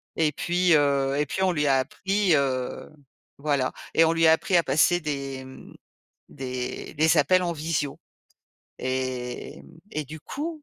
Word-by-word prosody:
et 155 -2 +2
puis, 175 +3 +1
heu 140 -2 +2
et 150 - +1
puis 190 +7 -2
on 185 - +3
lui 150 -3 0
a 135 -1 +4
appris, 195 +7 0
heu, 130 -3 -1 0.5
voilà 140 -3 0 0.2
et 165 - +5
on 165 - +2
lui 165 0 +2
a - - +7
appris 180 +3 0
à 170 - +3
passer 155 +6 +3
des, 140 -3 -4
mmh, 130 - -13 0.6
des 130 -2 -5
des 155 +2 +3
appels 180 +6 +4
en 170 -1 -1
visio 155 -2 -2 0.8
et 130 -1 -4
mmh 165 - -17 0.2
et 155 -1 -3
du 155 +2 -10
coup 310 - -6
150 Hz, 170 wpm, -25 LUFS, 135-170 Hz, 0.8 s, a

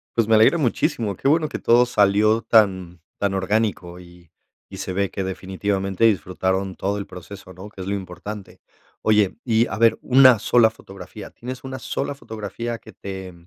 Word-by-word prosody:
Pues 115 -2 +2
me 115 - +2
alegra 110 +10 +5
muchísimo, 115 - -1
qué 135 - -3
bueno 155 +2 +3
que 145 - -6
todo 120 +1 +4
salió 105 0 +3
tan 95 -7 +2 0.2
tan 100 -1 0
orgánico 95 -2 -1
y 85 -2 -17 0.4
y - - -9
se - - -5
ve 100 +1 -1
que 95 - -3
definitivamente 95 +1 -3
disfrutaron 95 -1 0
todo 100 +1 -2
el 100 - -6
proceso, 95 +1 -11
¿no? 95 +4 -11
Que 105 - -17
es 95 - -6
lo 100 - -1
importante. 95 +2 -8 0.4
Oye, 105 -3 +2
y 115 -1 +3
a 100 - -5
ver 115 0 +4
una 130 -3 +6
sola 115 +1 +4
fotografía, 100 -1 -11
¿tienes 125 +1 -8
una 130 0 -6
sola 140 +4 -4
fotografía 115 -1 -6
que 110 - -14
te 95 -2 -8
100 Hz, 180 wpm, -22 LUFS, 95-115 Hz, 0.4 s, una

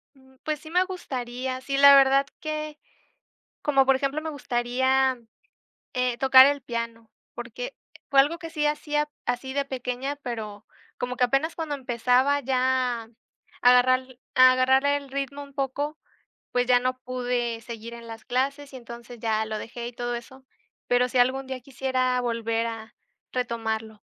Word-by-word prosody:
Mm, 265 -1 -22
pues 305 -1 -2
sí 315 - -11
me 360 +2 +3
gustaría, 255 -8 -5
sí, 275 +1 -2
la 280 0 +9
verdad 275 0 +5
que 305 -1 -4 0.8
como, 275 -2 +3
por 270 0 +4
ejemplo, 275 +3 -1
me 320 - -4
gustaría, 260 -1 +1 0.8
eh, 250 -1 0
tocar 265 0 +8
el 285 0 +1
piano, 230 -2 -5 0.2
porque - - -6 0.4
fue 275 -1 +7
algo 300 +5 +1
que 330 -1 -8
sí 300 -2 0
hacía, 295 0 0 0.2
así 245 +2 -2
de 280 0 0
pequeña, 260 +1 -4
pero 220 -6 -6 0.3
como 250 0 -3
que 250 - +3
apenas 275 +6 +1
cuando 320 -3 -3
empezaba 255 +2 +2
ya 255 -2 +1
a - - -19 0.5
agarrar 255 +1 +4 0.2
a 255 0 +8
agarrar 260 +1 +3
el 285 -1 0
ritmo 280 +1 -4
un 280 -1 -13
poco, 285 +3 -2 0.5
pues 245 0 +1
ya 250 -1 +5
no 255 +1 -1
pude 245 -2 -2
seguir 230 0 -8
en 235 0 -10
las 225 -1 -9
clases, 275 +3 -1
y - - -7
entonces 235 -1 -10
ya 220 -1 0
lo 215 0 -4
dejé 235 +2 -6
y 245 - -8
todo 240 0 -3
eso. 260 +3 -10 0.4
Pero 245 0 +3
sí, 255 - -1
algún 260 +2 +2
día 260 -1 -5
quisiera 255 -1 -1
volver 230 -1 -1
a 225 -1 -8 0.4
retomarlo. 225 -3 -3
255 Hz, 165 wpm, -26 LUFS, 240-275 Hz, 0.8 s, la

